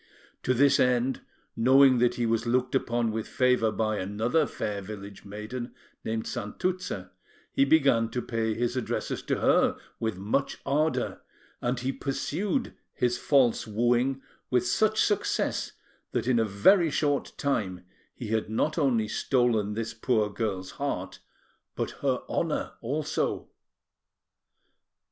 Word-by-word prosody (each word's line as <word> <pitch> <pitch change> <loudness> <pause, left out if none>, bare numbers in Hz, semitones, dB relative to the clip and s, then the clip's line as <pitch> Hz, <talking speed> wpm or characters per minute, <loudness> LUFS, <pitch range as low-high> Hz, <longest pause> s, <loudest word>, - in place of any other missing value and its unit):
To 130 - +1
this 140 +3 +4
end, 125 +1 +2 0.3
knowing 130 +2 +6
that 120 0 +3
he 120 - 0
was 115 +1 0
looked 125 +1 +1
upon 120 -3 +1
with 110 0 -3
favour 125 -5 +2
by 110 -1 -1
another 115 +10 +1
fair 105 -2 -4
village 100 0 -9
maiden, 110 +5 -6 0.3
named 110 0 -2
Santuzza, 105 - -3 0.4
he 135 - +3
began 135 -7 +4
to 125 - -3
pay 110 -2 -1
his 120 +1 -1
addresses 130 - -2
to - - -2
her - - +3 0.2
with 110 -4 -2
much 105 +8 -1
ardour; 155 +3 0 0.4
and 125 +1 -1
he 130 +2 0
pursued 155 - -2 0.2
his 120 0 0
false 130 -7 +3
wooing 120 +4 +1 0.3
with 125 -1 +2
such 215 - +2
success 205 - 0 0.4
that - - 0
in 125 -2 +3
a 115 - +3
very 165 - +4
short 145 -1 0
time 95 -10 -1 0.3
he 115 - -6
had 110 -1 0
not 150 +9 0
only 120 -7 +2
stolen 110 -2 +1
this 115 0 -3
poor 110 -2 +1
girl's 95 -3 -3
heart, - - -3 0.6
but - - -2
her - - 0
honour, - - -1
also. 150 +5 -2
120 Hz, 135 wpm, -28 LUFS, 110-135 Hz, 0.6 s, knowing